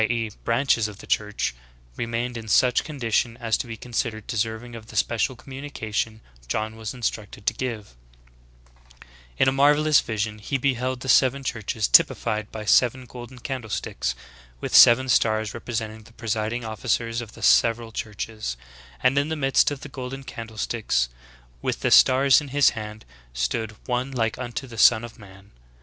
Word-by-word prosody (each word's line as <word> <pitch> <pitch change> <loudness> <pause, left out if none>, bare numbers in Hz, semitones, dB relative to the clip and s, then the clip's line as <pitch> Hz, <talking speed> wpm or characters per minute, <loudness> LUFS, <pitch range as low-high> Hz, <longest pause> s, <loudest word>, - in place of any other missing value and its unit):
e. 115 -2 -1
branches 115 -2 +2
of 105 -2 -10
the - - -12
Church, 105 -9 -1 0.4
remained 115 - -3
in 115 -1 -7
such 125 +3 +3
condition 120 -5 -1
as 115 -3 0
to - - -4
be 115 -1 -7
considered 115 -2 -3
deserving 115 +2 -3
of 110 -1 -10
the 110 - -12
special 115 +4 +1
communication 115 -5 -5 0.3
John 110 - -2
was 110 +2 -6
instructed 105 -4 -4
to - - +2
give 115 - -5 1.1
J - - -14 0.3
In - - +3
a - - +5
marvelous 145 +2 +4
vision 105 -1 -3
he 120 +6 -2
be 135 +1 +1
held 130 +1 -3
the 130 - -7
seven 135 +1 +4
churches 110 -3 -2
typified 110 -2 +3
by 110 -1 -6
seven 125 +4 +3
golden 125 +1 -10
candle 130 -4 -5
sticks, - - -3 0.4
with - - -5
seven 130 +3 +8
stars 110 -3 +2
representing 110 -2 -5
the 110 +2 -18
presiding 115 +1 -2
officers 115 +1 -1
of 110 -2 -10
the 115 - -11
several 115 0 +3
churches; 110 - -5 0.5
and 130 - +4
in 145 +2 -1
the 160 - -1
midst 135 -3 +3
of 145 -2 -6
the - - -7
golden 135 0 -7
candle 115 -4 -9
sticks, 105 - 0 0.5
with - - -2
the - - +1
stars 135 +3 +6
in 145 - -8
his 140 +1 +4
hand, 110 -1 -8 0.3
stood 110 - -2
"one 125 +1 -1
like 115 -4 -1
unto 125 +2 -4
the 115 -3 -9
Son 115 0 +6
of 120 0 -10
Man." 100 -1 -15
115 Hz, 170 wpm, -24 LUFS, 110-130 Hz, 1.1 s, seven